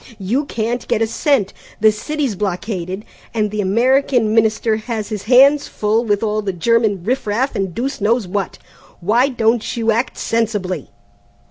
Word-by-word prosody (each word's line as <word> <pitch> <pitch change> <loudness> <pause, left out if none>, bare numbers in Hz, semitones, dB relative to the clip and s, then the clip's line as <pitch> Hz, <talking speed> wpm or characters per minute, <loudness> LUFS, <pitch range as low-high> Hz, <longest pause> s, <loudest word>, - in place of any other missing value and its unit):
You 225 +9 -1
can't 235 -1 -3
get 225 - +1
a - - +3
cent, 225 -2 0 0.3
the 215 0 +5
city's 280 +4 -2
blockaded, 190 0 -4 0.3
and 210 -2 0
the 210 0 -1
American 240 +2 +2
Minister 220 0 +2
has 220 -1 -4
his 210 -3 -5
hands 275 +5 +5
full 215 +2 0
with 205 -1 0
all 215 -1 0
the 200 -2 -2
German 210 0 +1
riff 250 +3 -1
raff 240 +7 0
and 195 -2 -1
deuce 260 -1 -3
knows 220 0 +1
what! 195 0 -3 0.4
Why 235 +9 +2
don't 230 -2 0
you 225 -1 +2
act 235 +4 -1
sensibly?" 210 -5 -2
220 Hz, 160 wpm, -18 LUFS, 205-240 Hz, 0.4 s, the